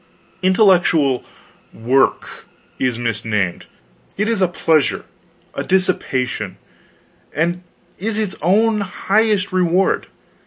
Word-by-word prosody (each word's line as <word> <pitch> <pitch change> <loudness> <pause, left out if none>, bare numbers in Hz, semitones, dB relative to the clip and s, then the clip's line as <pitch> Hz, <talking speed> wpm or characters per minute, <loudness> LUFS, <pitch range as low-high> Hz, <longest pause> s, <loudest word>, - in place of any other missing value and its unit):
Intellectual 180 - +3 0.5
"work" 125 +5 0 0.3
is 125 -3 0
misnamed; 105 -5 -2 0.5
it 210 +2 0
is 225 -3 0
a 185 - +4
pleasure, 160 -4 +1 0.5
a - - -3
dissipation, 130 - -1 0.8
and 170 +4 -1 0.4
is 215 +3 -2
its 215 -3 -2
own 215 +6 +3
highest 200 0 0
reward. 185 +1 +1
180 Hz, 90 wpm, -19 LUFS, 130-195 Hz, 0.8 s, a